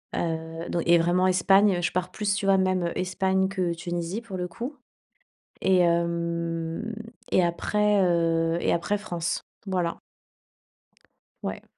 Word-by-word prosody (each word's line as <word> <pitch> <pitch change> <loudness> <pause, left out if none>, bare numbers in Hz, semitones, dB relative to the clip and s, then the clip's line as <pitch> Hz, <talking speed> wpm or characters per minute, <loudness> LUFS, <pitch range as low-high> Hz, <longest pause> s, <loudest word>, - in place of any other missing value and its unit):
Heu 165 0 -3
donc 170 - -1
et 170 0 +7
vraiment 175 +2 +2
Espagne. 190 +1 +4
Je 170 - 0
pars 180 0 -1
plus, 205 -2 -1
tu 200 0 -2
vois, 195 0 +5
même 185 -2 +1
Espagne 190 +1 +1
que 185 -3 -1
Tunisie, 175 +4 -4
pour 225 -5 -8
le 180 0 -2
coup 245 - -6 0.9
et 190 -1 +4
hem 170 +3 0 0.4
et 185 - +4
après, 210 +4 +2
heu 165 -1 +2
et - - +1
après 185 +5 0
France. 175 -5 -3 0.2
Voilà. 180 -3 -1 1.4
Ouais. - - -4
175 Hz, 140 wpm, -26 LUFS, 170-195 Hz, 1.4 s, et